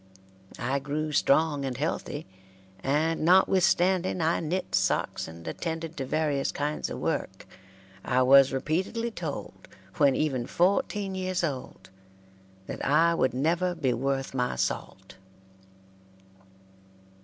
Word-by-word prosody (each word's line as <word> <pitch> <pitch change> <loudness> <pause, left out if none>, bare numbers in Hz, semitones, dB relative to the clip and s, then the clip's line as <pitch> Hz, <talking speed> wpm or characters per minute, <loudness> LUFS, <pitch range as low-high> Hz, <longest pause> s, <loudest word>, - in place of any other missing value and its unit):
I 130 +3 -1
grew 150 +2 -3
strong 145 0 +2
and 130 -3 -3
healthy, 145 +1 -3 0.6
and, 155 +6 0
notwithstanding 185 +1 +3
I 165 +1 +1
knit 170 +4 -3
socks - - 0
and 85 0 -11
attended 165 - -4
to 135 -2 -3
various 145 -2 0
kinds 150 +1 -2
of - - -5
work, - - -3 0.6
I 130 +1 +2
was 135 +1 +7
repeatedly 185 - -1
told, - - -6 0.3
when 140 -4 +4
even 130 -6 -1
fourteen 200 +1 +1
years 185 -1 -2
old, 135 - -5 0.7
that - - -6
I 165 +4 +4
would 130 -7 +1
never 170 +6 +1
be 135 -7 0
worth 135 +2 -2
my 125 -1 -1
salt. 95 0 -4
150 Hz, 120 wpm, -27 LUFS, 135-175 Hz, 0.7 s, was